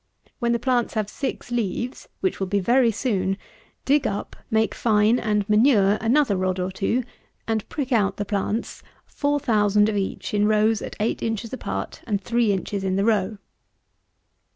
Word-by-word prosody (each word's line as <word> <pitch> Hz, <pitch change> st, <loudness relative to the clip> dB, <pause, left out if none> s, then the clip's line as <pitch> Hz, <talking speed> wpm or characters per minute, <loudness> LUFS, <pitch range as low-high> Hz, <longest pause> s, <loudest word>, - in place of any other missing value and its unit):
When 235 Hz, -2 st, +1 dB
the 235 Hz, -, +2 dB
plants 245 Hz, -1 st, 0 dB
have 215 Hz, -1 st, -1 dB
six 270 Hz, -3 st, -4 dB
leaves, 240 Hz, +2 st, -3 dB
which 375 Hz, -, -1 dB
will 190 Hz, -, -1 dB
be 200 Hz, +2 st, +1 dB
very 240 Hz, +5 st, +3 dB
soon, 195 Hz, -5 st, -1 dB, 0.5 s
dig 285 Hz, +1 st, +3 dB
up, 200 Hz, -, -4 dB
make 220 Hz, 0 st, +1 dB
fine, 220 Hz, +1 st, +3 dB
and 210 Hz, -2 st, 0 dB
manure 210 Hz, -2 st, +4 dB
another 235 Hz, -1 st, +3 dB
rod 185 Hz, 0 st, -1 dB
or 180 Hz, +1 st, -2 dB
two, 220 Hz, +6 st, 0 dB, 0.4 s
and 220 Hz, -2 st, -1 dB
prick 280 Hz, -3 st, -4 dB
out 200 Hz, -5 st, +2 dB
the 205 Hz, -, -2 dB
plants, 205 Hz, +3 st, -2 dB, 0.2 s
4000 215 Hz, -8 st, +2 dB
of 215 Hz, -, -2 dB
each 195 Hz, +1 st, -3 dB
in 210 Hz, 0 st, +3 dB
rows 215 Hz, 0 st, +3 dB
at -, -, -6 dB
eight 215 Hz, +2 st, -1 dB
inches 225 Hz, +1 st, -3 dB
apart 260 Hz, -, -5 dB
and 205 Hz, -3 st, 0 dB
three 230 Hz, +1 st, +1 dB
inches 195 Hz, +1 st, -2 dB
in 190 Hz, -1 st, 0 dB
the 195 Hz, +1 st, +1 dB
row. 210 Hz, -2 st, +1 dB
215 Hz, 170 wpm, -24 LUFS, 200-240 Hz, 0.5 s, manure